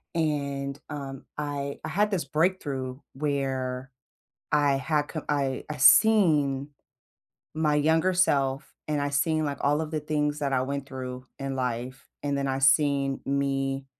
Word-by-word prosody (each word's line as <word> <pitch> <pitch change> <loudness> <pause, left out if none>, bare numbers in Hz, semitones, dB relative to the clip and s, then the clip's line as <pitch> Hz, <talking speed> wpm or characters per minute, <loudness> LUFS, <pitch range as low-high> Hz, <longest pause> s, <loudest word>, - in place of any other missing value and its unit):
And, 140 -3 -1
um, 140 -3 -6
I 145 -1 -3
I - - -4
had 210 +2 +1
this 180 -7 -1
breakthrough 140 -5 -1
where 135 -2 -2 0.6
I 145 -1 +3
had 150 +2 0
co 155 - -5
I 140 -3 0
I 150 - -5
seen 150 - +5 0.9
my 155 -1 +2
younger 160 +5 +3
self, 140 -6 +1
and 150 -1 0
I 145 - 0
seen, 155 +2 +1
like, 140 -1 -3
all 145 +2 +2
of 155 - -4
the 155 - -1
things 150 0 -1
that 140 -2 -1
I 130 - +2
went 140 +1 -3
through 130 -1 -6
in 135 -1 -3
life, 125 +1 -3 0.2
and 140 -1 0
then 140 0 -1
I 135 0 -1
seen 135 0 +3
me 135 -1 -1
140 Hz, 155 wpm, -27 LUFS, 135-150 Hz, 0.9 s, seen